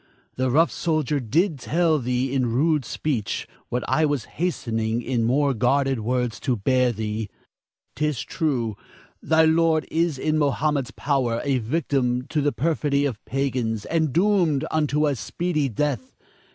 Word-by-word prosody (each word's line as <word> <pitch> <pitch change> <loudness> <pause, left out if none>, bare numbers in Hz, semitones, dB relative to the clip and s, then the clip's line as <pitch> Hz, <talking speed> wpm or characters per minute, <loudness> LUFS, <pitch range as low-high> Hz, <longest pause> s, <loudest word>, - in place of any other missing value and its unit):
The 130 0 0
rough 160 +7 +3
soldier 155 -4 0
did 155 - +1
but 125 - -12
tell 165 -2 +2
thee 125 +1 -1
in 130 -4 +1
rude 150 +2 +2
speech, 120 -11 -2 0.2
what 125 0 -1
I 160 - +2
was 145 -6 0
hastening 115 -9 -2
in 120 -2 0
more 140 +3 +2
guarded 135 +2 +1
words 125 +1 -1
to 125 -4 0
bear 125 +4 +2
thee. 110 -1 -4 0.7
'Tis 150 -5 -1
true; 125 -9 -1 0.5
thy 160 0 +4
lord 160 0 +3
is 165 -3 +1
in 155 +3 0
Mohammed's 145 -2 +1
power, 130 -5 0
a 140 -3 +1
victim 125 -1 0
to 155 - 0
the 145 0 +2
perfidy 145 -3 0
of 120 -7 -3
pagans, 125 -5 -1
and 160 -3 0
doomed 170 -5 +2
unto 150 -1 +1
a 145 -2 +1
speedy 150 - -1
death. 150 - -2
140 Hz, 150 wpm, -24 LUFS, 125-155 Hz, 0.7 s, thy